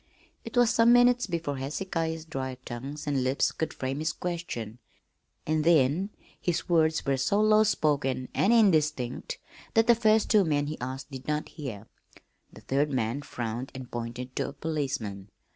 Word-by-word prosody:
It 255 - -6
was 240 -1 +5
some 230 0 +5
minutes 245 -1 +5
before 165 -6 -2
Hezekiah's 160 +3 -3
dry 130 -4 -4
tongue 130 +5 -6
and 140 -3 0
lips 130 +2 +1
could 160 - -3
frame 135 +2 -3
his 155 0 -1
question, 145 -11 -5 0.7
and 155 0 +1
then 165 +3 +3 0.3
his 175 -2 -1
words 160 -2 +2
were 135 -1 +1
so 200 +10 +1
low 215 0 +5
spoken 140 -10 0
and 205 - +3
indistinct 155 - +2 0.4
that 225 0 +5
the 240 - +7
first 220 -2 +3
two 210 -2 +6
men 145 -4 +1
he 150 -1 -6
asked 130 +3 -5
did 130 -1 -8
not 150 0 -1
hear. 120 -10 -7 0.7
The - - -14
third 140 +3 0
man 125 +1 -1
frowned 120 -2 -5
and 130 -2 -8
pointed 120 +2 -5
to - - 0
a - - -10
policeman. 130 -11 -3
150 Hz, 165 wpm, -28 LUFS, 130-175 Hz, 0.7 s, the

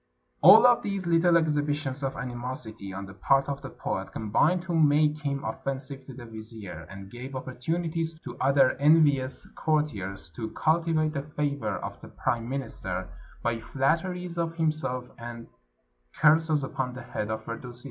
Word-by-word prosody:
All 195 +9 +10
of 245 -1 +6
these 200 -2 -2
Httle 170 0 +4
exhibitions 145 -3 0
of 135 -1 -2
animosity 120 -5 -5
on 100 +1 -5
the 95 - -11
part 135 +7 +2
of 140 -1 -3
the - - -7
poet - - -4
combined 145 - +2
to 175 -1 -3
make 150 -1 +4
him 140 -2 -2
offensive 135 +4 -5
to 130 - -10
the 125 -2 -9
vizier, 110 -8 -9
and 100 0 -10
gave 130 +3 -7
opportunities 160 +5 -2
to 120 -2 -8
other 135 0 +5
envious 140 -4 +4
courtiers 100 - -1
to 110 +7 -5
cultivate 160 -1 +2
the 140 - -1
favor 140 -8 -2
of - - -7
the - - -10
prime 115 0 -2
minister 135 0 -4 0.3
by 115 -1 0
flatteries 170 +8 -1
of 165 0 -1
himself, 155 -6 -1
and 115 0 -7 0.7
curses 155 -1 +4
upon 130 -1 -3
the 130 - -7
head 105 -3 -4
of 110 0 -3
Firdusi. 120 +1 -7
135 Hz, 155 wpm, -28 LUFS, 120-155 Hz, 0.7 s, All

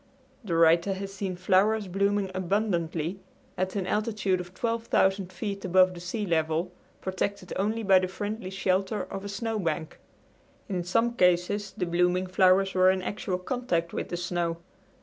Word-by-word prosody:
The 180 -6 -2
writer 170 +3 +4
has 195 0 -6
seen 195 -2 -3
flowers 195 +4 +2
blooming 200 +1 0
abundantly 180 -3 -1 0.4
at 185 +1 -2
an 195 -2 -1
altitude 210 -2 0
of 180 0 -7
12,000 205 -5 +1
feet 200 +1 -5
above 185 0 +4
the 175 - -9
sea 185 +5 -3
level, 165 0 0 0.3
protected 190 0 -3
only 215 +4 -1
by 190 -2 +6
the 185 - -1
friendly 205 +1 -5
shelter 190 +1 0
of 195 0 -7
a 200 - -5
snowbank. 200 -7 -3 0.7
In 185 -4 -2
some 230 +7 +1
cases 180 +1 +2
the 180 - 0
blooming 180 +1 +1
flowers 185 +1 +3
were 185 0 +5
in 190 0 +1
actual 195 -2 -2
contact 180 -5 -2
with - - -3
the 175 - -3
snow. 175 -1 -2
185 Hz, 155 wpm, -27 LUFS, 180-200 Hz, 0.7 s, by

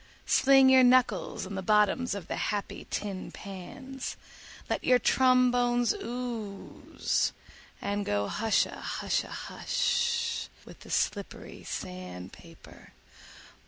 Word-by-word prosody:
Sling 270 0 +6
your 260 -1 +7
knuckles 245 -8 +3
on 195 - -7
the 190 - -3
bottoms 210 +4 +2
of 195 -5 -7
the - - -3
happy 205 -2 -3
tin 195 -3 -4
pans, 260 +8 -7 0.5
let - - -2
your 250 - +5
trombones 245 -1 +3
ooze, 240 - -3 0.5
and 205 +1 -2
go 100 - 0
hushahusha 220 -1 0
hush 470 -1 -1 0.2
with - - -13
the - - -14
slippery 200 -2 -2
sand 90 0 -7
paper. - - -15
230 Hz, 105 wpm, -29 LUFS, 200-255 Hz, 0.5 s, your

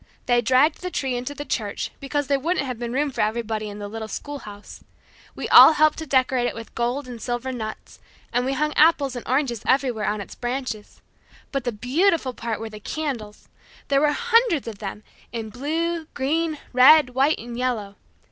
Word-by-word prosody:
They 240 -1 +3
dragged 260 +6 +3
the 365 - -3
tree 265 -7 -2
into 250 +4 -4
the 290 +1 -6
church 210 -7 -3
because 290 +1 -2
there 280 0 +1
wouldn't 325 +1 0
have 250 -3 -5
been 240 -1 -4
room 280 +3 0
for - - -2
everybody 215 0 -1
in 205 - -8
the 205 -1 -6
little 220 +1 -6
school 290 +5 -6
house. 205 -3 -11 0.5
We - - -4
all 315 - +10
helped 310 0 +3
to 320 - -6
decorate 255 -2 +2
it - - -4
with 230 0 -9
gold 245 +3 -2
and 240 -2 -8
silver 245 +1 -3
nuts, 220 -4 -7 0.3
and 245 - +2
we 265 +2 -1
hung 300 +2 0
apples 290 -4 +4
and 245 - -5
oranges 255 -3 0
everywhere 255 -5 +1
on 210 0 -1
its 200 - -8
branches. 245 -3 -5 0.5
But 275 -3 -2
the 245 - 0
beautiful 265 - +1
part 230 -2 -4
were 225 - -5
the 215 -1 -10
candles. 235 -5 -5 0.4
There 275 0 +3
were 300 0 +4
hundreds 460 - +2
of 215 -3 -7
them 210 0 -6 0.3
in 225 -2 -5
blue, 320 +6 -2
green, 310 +3 0 0.2
red, 255 +2 +7
white 275 +5 +2
and 235 +1 -8
yellow. 235 -5 -2
255 Hz, 195 wpm, -23 LUFS, 230-290 Hz, 0.5 s, all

